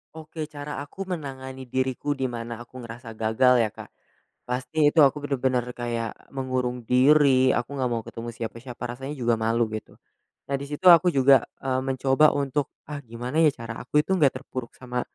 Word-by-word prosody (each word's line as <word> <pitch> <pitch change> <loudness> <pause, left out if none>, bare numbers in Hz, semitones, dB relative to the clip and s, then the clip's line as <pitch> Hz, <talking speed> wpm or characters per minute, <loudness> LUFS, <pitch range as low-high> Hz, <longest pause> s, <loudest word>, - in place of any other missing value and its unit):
Oke, 155 0 -6
cara 150 -1 -6
aku 145 +7 -6
menangani 130 -7 -6
diriku, 130 +3 -1
di 130 -2 -2
mana 115 0 -6
aku 130 +2 -12
ngerasa 115 0 -9
gagal 115 +3 +3
ya, 115 - +3
Kak? - - -11 0.6
Pasti 130 +5 +1
itu 160 - +6
aku 140 0 +5
bener-bener 130 -3 0
kayak 120 -2 -5
mengurung 130 -2 -3
diri, 130 +1 +5
aku 120 +3 0
nggak 130 -3 -1
mau 115 -1 -1
ketemu 115 +1 -7
siapa-siapa, 115 +2 -7
rasanya 135 +3 -7
juga 120 -2 +1
malu 115 +1 +1
gitu. 110 - -7 0.5
Nah 140 - +1
di - - -4
situ 150 +5 -6
aku 175 +1 +8
juga, 135 -2 +5 0.2
eee, 130 -1 0
mencoba 135 +3 +3
untuk, 140 0 -1 0.2
"Ah, 145 -1 -6
gimana 125 +5 -2
ya 155 - +6
cara 115 0 -7
aku 150 +5 +2
itu 190 - 0
nggak 150 -8 +3
terpuruk 130 -3 -7
sama 125 -1 -3
130 Hz, 180 wpm, -25 LUFS, 120-145 Hz, 0.6 s, aku